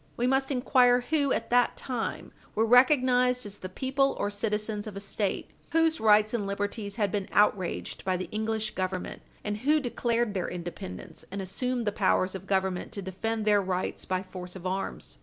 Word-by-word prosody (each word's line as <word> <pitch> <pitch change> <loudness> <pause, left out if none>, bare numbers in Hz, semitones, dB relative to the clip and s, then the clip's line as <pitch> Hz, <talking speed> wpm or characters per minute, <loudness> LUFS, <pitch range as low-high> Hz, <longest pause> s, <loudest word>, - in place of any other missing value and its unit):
We 240 - +1
must 265 +1 +2
inquire 250 -2 +4
who, 285 -4 +2
at - - -1
that 245 0 +3
time, 245 -4 -4 0.2
were 220 - +3
recognised 250 0 +4
as 205 0 -7
the 185 - -6
people 270 +6 +1
or 205 - -1
citizens 210 0 -2
of 210 - -7
a - - -4
State 200 0 -2 0.2
whose 325 0 +3
rights 215 0 +5
and 210 -4 -1
liberties 200 +1 -3
had 205 -4 0
been 200 -2 -2
outraged 205 -3 +1
by 185 -1 0
the 185 - -4
English 220 0 -1
Government, 185 -1 -3 0.2
and 210 0 -2
who 295 +7 +3
declared 240 -4 0
their 185 -3 -2
independence 170 - -7
and 200 - -5
assumed 240 +6 -2
the 210 - +1
powers 185 -2 +2
of 190 0 -7
Government 190 -2 0
to 200 - -4
defend 215 +4 -3
their 205 -1 +4
rights 185 -1 -2
by 185 0 -1
force 180 -1 -8
of 185 -1 -9
arms. 190 +1 -4
210 Hz, 185 wpm, -28 LUFS, 190-245 Hz, 0.2 s, rights